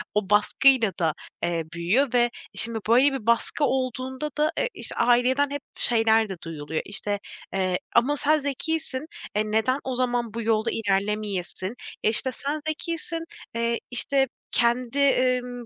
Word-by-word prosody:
o 210 -2 0
baskıyla 225 +2 +4
da, 160 -2 +1 0.3
eee, 170 -1 0
büyüyor 220 +11 +1
ve 245 - +4
e, 240 - +1 0.3
şimdi 230 0 +4
böyle 260 +5 +5
bir 245 -5 -6
baskı 235 +5 +1
olduğunda 260 +2 -2
da 305 +1 +2
e, - - +1
iş - - 0
aileden 255 +4 +3
hep 285 -1 -4
şeyler 225 -2 +3
de 190 - -4
duyuluyor, 155 -1 -4
işte, 205 0 -2 0.3
eee, 185 -2 0 0.2
ama 275 +5 +3
sen 305 +2 +2
zekisin, 290 0 -3 0.3
e, 215 0 0
neden 240 +5 +1
o 260 -1 -3
zaman 245 -3 -1
bu 230 - -3
yolda 225 0 +1
ilerlemeyesin? 200 -1 -2 0.3
E, - - +4
işte 255 +4 +6
sen 285 +4 -4
zekisin, 330 +1 -3 0.3
eee, 235 0 0
işte, 270 +2 +3 0.2
kendi, 240 +2 +1
emm, 250 -3 +1
240 Hz, 155 wpm, -25 LUFS, 210-270 Hz, 0.3 s, işte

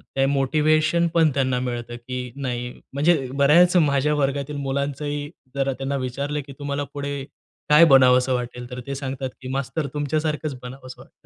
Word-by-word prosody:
ते 135 0 +3
मोटिव्हेशन 155 +4 +2
पण 165 -2 +4
त्यांना 130 -2 +1
मिळतं 120 -1 -4
की 125 +1 -6
नाही 125 -3 -3 0.2
म्हणजे, 145 -1 +2
बऱ्याच 170 +6 +5
माझ्या 150 -2 +3
वर्गातील 140 0 -1
मुलांचंही 140 +1 -3 0.3
जरा 135 0 0
त्यांना 135 +2 -3
विचारलं 140 +3 -3
की, 140 - -9
“तुम्हाला 145 0 -2
पुढे 140 -1 -4 0.5
काय 150 +3 +8
बनावंस 130 -3 +5
वाटेल?” 125 -1 -3
तर 125 - -5
ते 140 - -3
सांगतात 135 -1 -4
की," 130 - -7
मास्तर 140 +3 -2
तुमच्या-सारखंच 150 0 -2
बनावंस 130 +1 -9
वाटतं." - - -19
140 Hz, 155 wpm, -23 LUFS, 130-150 Hz, 0.5 s, काय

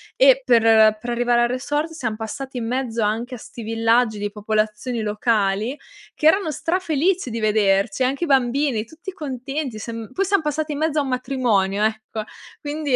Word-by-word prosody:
E - - +6
per 220 - +5
per 240 - -6
arrivare 240 0 +2
al - - +3
resort 290 +5 -2
siam 245 -9 -3
passati 250 +4 -6
in 235 - -3
mezzo 240 -3 -1
anche 230 +5 -1
a - - -8
'sti 230 - -10
villaggi 225 0 +2
di 205 0 -3
popolazioni 215 +3 -2
locali, 215 +2 0 0.4
che - - -4
erano 360 0 +4
strafelici 340 0 0
di 230 0 -4
vederci, 210 +1 +2
anche 270 +6 0
i - - 0
bambini 265 -3 +1
tutti 325 - -9
contenti 275 - -4
siam 225 0 -6
poi 390 - 0
siam 395 -1 +2
passati 305 +1 -2
in 290 - -3
mezzo 310 -1 0
a - - +1
un 270 - -4
matrimonio, 235 -7 0
ecco, 220 0 -2 0.4
quindi 295 -2 -1
245 Hz, 175 wpm, -22 LUFS, 220-295 Hz, 0.4 s, E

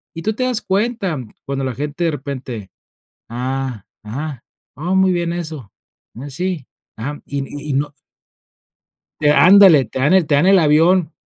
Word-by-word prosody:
y 165 - -5
tú 220 - 0
te 255 - -2
das 245 -3 -1
cuenta, 200 - -1 0.3
cuando 135 0 -3
la 130 -2 -3
gente 150 +5 -3
de 165 - +2
repente: 130 -7 -6 0.6
"Ah, 125 -2 -4 0.2
ajá, 135 +4 -6 0.3
oh, 175 +7 -2
muy 190 0 +4
bien 170 -1 -1
eso, 155 - -6 0.4
mm, 130 +5 -8
sí, 175 0 -3 0.3
ajá". 145 +6 -5
Y 140 - -4 0.3
y - - 0
y - - -1
no 145 +2 -1 1.3
Te 150 -1 +4
¡ándale!, 175 -1 +7
te 130 - -6
dan 140 +7 +3
el 185 -5 +4
te 145 - +3
dan 145 - +3
el 195 0 +6
avión, 165 +2 +3
150 Hz, 170 wpm, -19 LUFS, 135-180 Hz, 1.3 s, ándale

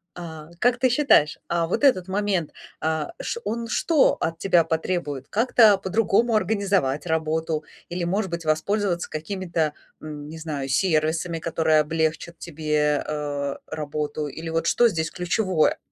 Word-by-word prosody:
А, 160 -3 -8
как 245 +3 +3
ты 255 +1 +3
считаешь, 245 - +4
а 170 -1 0
вот 175 - -2
этот 190 -10 +4
момент, 190 -4 -1 0.3
а, 160 - -2
ш - - -3
он 230 0 -2
что 305 +5 +3
от 165 0 -2
тебя 175 -2 +3
потребует? 160 -4 -2
Как-то 225 -1 +5
по-другому 220 +4 +2
организовать 195 -8 0
работу 160 -1 -1 0.3
или, 175 0 -3
может 190 +2 -1
быть, 170 -1 -5
воспользоваться 175 +3 0
какими-то, 165 -2 -2 0.3
м, 150 -1 -7
не 160 - -8
знаю, 150 -4 -4
сервисами, 165 +2 +1
которые 160 -1 +2
облегчат 160 +2 -1
тебе, 150 -2 0
э, 145 -2 -3
работу 150 -1 -4
или 160 +3 -7
вот 165 +1 -1
что 240 - +5
здесь 165 -6 -1
ключевое? 180 -2 +1
165 Hz, 145 wpm, -24 LUFS, 155-195 Hz, 0.3 s, Как-то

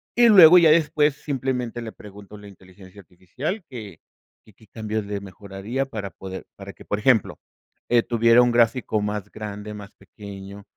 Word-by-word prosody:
y 240 0 +5
luego 180 -5 +9
ya 165 -3 +6
después 150 -2 +2
simplemente 125 -4 -3
le 110 - -7
pregunto 105 -1 -14
a - - -12
la 105 - -13
inteligencia 95 0 -16
artificial 95 - -6
que 110 - -10 0.4
que 110 - -21
qué 110 - -21
cambios 110 0 -5
le 100 0 -4
mejoraría 100 +6 -6
para 110 -7 -6
poder 95 0 -10
para 100 0 -10
que, - - -16
por 105 - -3
ejemplo, 110 0 +1 0.5
eh, 120 -1 +4
tuviera 115 0 +3
un 120 0 +2
gráfico 115 -1 +1
más 105 -1 -4
grande, 105 0 -8
más 105 -1 -11
pequeño, 100 -1 -12
105 Hz, 175 wpm, -23 LUFS, 100-125 Hz, 0.5 s, luego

